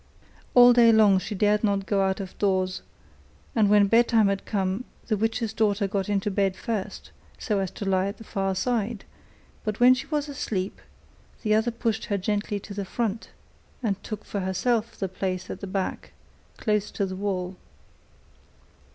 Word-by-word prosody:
All 245 0 +9
day 235 -1 +6
long 210 -4 +5
she 205 +3 -5
dared 210 +2 +2
not 200 -2 +1
go 200 -1 +1
out 190 0 0
of 190 -2 -7
doors, 185 -2 0 0.7
and 215 -3 +4
when 205 -1 +6
bedtime 225 0 +4
had 200 0 -3
come, 195 +2 -1 0.2
the 220 - 0
witch's 225 +1 -1
daughter 210 -2 +1
got 195 0 -2
into 205 0 0
bed 195 -1 +1
first, 215 -1 -5 0.3
so 210 -4 -1
as 190 -1 -1
to 200 - -7
lie 190 0 +2
at 200 +1 -5
the - - -11
far 195 -2 -2
side, 225 0 -1 0.6
but 215 -2 -3
when 250 +1 +8
she 255 - -4
was 300 -2 -1
asleep, 205 -9 -3 0.6
the 215 -2 +2
other 220 +2 +3
pushed 225 -1 -2
her 205 - -1
gently 205 +1 -1
to 200 - -9
the 200 0 -3
front, 220 +2 -3 0.5
and 200 -4 -1
took 215 -1 -6
for 200 - -4
herself 215 +5 -1
the 195 - -2
place 185 0 -4
at - - -6
the 200 - -6
back, 190 0 -3 0.4
close 210 -2 0
by 200 - -1
the 185 -1 -5
wall. 185 -2 -3
205 Hz, 175 wpm, -26 LUFS, 195-220 Hz, 0.7 s, All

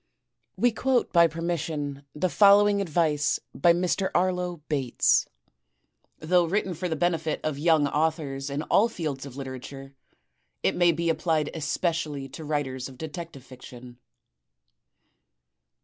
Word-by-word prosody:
We 245 - +3
quote 250 +2 0
by 170 -1 +6
permission 160 -4 -3
the 160 +5 0
following 200 +2 +5
advice 155 -5 +1
by 170 +5 +4
Mr. 180 +2 0
Arlo 180 -3 0
Bates. 135 -5 +2 0.9
Though 175 +2 +2
written 190 +2 -1
for 175 +2 -4
the 160 - -1
benefit 160 -1 0
of 155 -2 -2
yoimg 155 -1 +3
authors 150 -3 -1
in 140 +2 -3
all 215 +8 +3
fields 150 -9 -5
of 130 - -11
literature, 135 0 -8 0.7
it - - +1
may 175 -1 +4
be 170 +1 -1
applied 160 -2 0
especially 155 -2 -2
to 160 - -9
writers 140 -4 -3
of 130 - -14
detective 160 -2 -8
fiction. 125 -1 -12
160 Hz, 130 wpm, -26 LUFS, 140-175 Hz, 0.9 s, by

